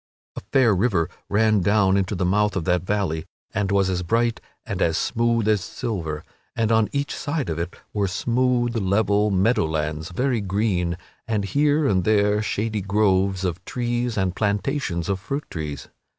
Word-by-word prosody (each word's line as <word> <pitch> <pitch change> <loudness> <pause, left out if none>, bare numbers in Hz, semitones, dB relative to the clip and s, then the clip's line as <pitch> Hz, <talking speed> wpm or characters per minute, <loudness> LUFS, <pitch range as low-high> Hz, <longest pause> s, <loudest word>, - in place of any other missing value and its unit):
A - - -6
fair 130 -6 +5
river 90 -4 +1 0.2
ran 110 0 +3
down 100 0 +3
into 100 +1 0
the 90 0 -1
mouth 105 +2 +2
of 90 -4 -2
that 90 -1 +2
valley 90 -5 -1 0.3
and 100 -1 0
it - - 0
was 100 -1 +3
as 90 -1 -1
bright 115 +6 0 0.2
and - - -4
as 80 -1 +2
smooth 115 -2 +1
as 105 -4 +2
silver, 80 -7 -4 0.3
and 115 -1 +1
on 110 -1 +3
each 140 +1 -2
side 145 - -2
of 80 - -3
it 85 +1 -4 0.2
were 100 -2 +1
smooth 120 +4 +1
level 105 0 +2
meadow 100 0 +2
lands 80 +1 -2
very 125 +4 0
green 95 -3 0 0.3
and 105 -3 0
here 145 +6 +2
and 95 -8 +2
there 105 0 +3
shady 105 0 -2
groves 95 -1 +1
of 90 +1 -3
trees 120 0 -2
and 95 -2 0
plantations 105 - -1
of 100 -1 -1
fruit 140 +10 -4
trees. 75 -4 -5
100 Hz, 175 wpm, -23 LUFS, 90-115 Hz, 0.3 s, fair